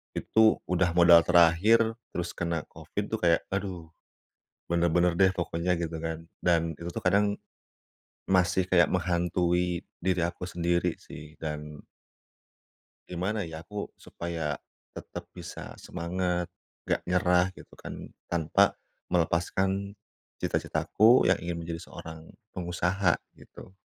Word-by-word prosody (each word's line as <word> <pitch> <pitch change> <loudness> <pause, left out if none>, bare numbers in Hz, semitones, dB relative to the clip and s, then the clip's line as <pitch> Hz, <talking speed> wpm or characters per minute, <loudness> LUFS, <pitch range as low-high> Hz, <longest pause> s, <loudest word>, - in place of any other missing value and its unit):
itu 110 0 +4
udah 90 0 +2
modal 85 -1 +8
terakhir 85 +6 +6 0.4
terus 85 0 -2
kena 85 -2 -2
COVID - - -5
tuh - - -5
kayak 85 -1 +4
aduh. 95 -4 -3 0.8
Bener-bener 85 +1 +3
deh 95 - +6
pokoknya 90 0 -1
gitu 85 -1 -3
kan 80 0 -4 0.2
dan 85 -1 +3
itu 85 - -6
tuh - - -4
kadang 100 +2 +3 0.9
masih 95 0 +3
kayak 85 -2 +6
menghantui 90 0 0 0.2
diri 95 -1 +1
aku 85 +1 -5
sendiri 85 0 0
sih 75 +1 -11
dan 75 -1 -6 1.2
gimana 95 +2 -2
ya 80 0 -8
aku 105 +3 -5
supaya 80 -4 -4 0.3
tetap - - -8
bisa - - -8
semangat, 90 0 -2 0.3
nggak - - 0
nyerah 90 0 +3
gitu - - -15
kan? - - -8 0.2
Tanpa 80 -3 +2 0.3
melepaskan 95 +4 0 0.4
cita-citaku 115 +4 +3
yang - - +3
ingin 85 0 -4
menjadi 85 0 -5
seorang 80 0 -10 0.2
pengusaha 90 +1 0 0.2
gitu. - - -13
85 Hz, 120 wpm, -28 LUFS, 85-90 Hz, 1.2 s, modal